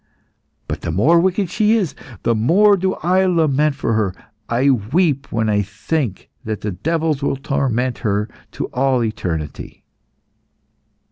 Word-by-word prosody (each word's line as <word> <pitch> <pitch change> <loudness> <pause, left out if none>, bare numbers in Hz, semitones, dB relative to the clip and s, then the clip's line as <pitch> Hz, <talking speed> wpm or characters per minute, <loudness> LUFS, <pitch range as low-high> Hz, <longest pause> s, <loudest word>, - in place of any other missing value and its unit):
But - - -4
the - - -4
more 125 - +4
wicked 185 0 0
she 215 0 +2
is, 180 -10 -1 0.3
the 115 - +2
more 185 - +4
do 190 0 -1
I 185 +3 +3
lament 155 -5 +2
for 140 -5 -1
her. 105 -4 0 0.3
I 130 +4 +3
weep 140 - 0
when 110 0 0
I 105 -1 +2
think 105 - -3
that 110 -1 -4
the 105 - -2
devils 155 - -1
will 140 - 0
torment 130 -2 -1
her 105 -2 0 0.3
to - - -3
all 130 -1 +2
eternity." 80 -9 -4
135 Hz, 145 wpm, -19 LUFS, 110-165 Hz, 0.3 s, more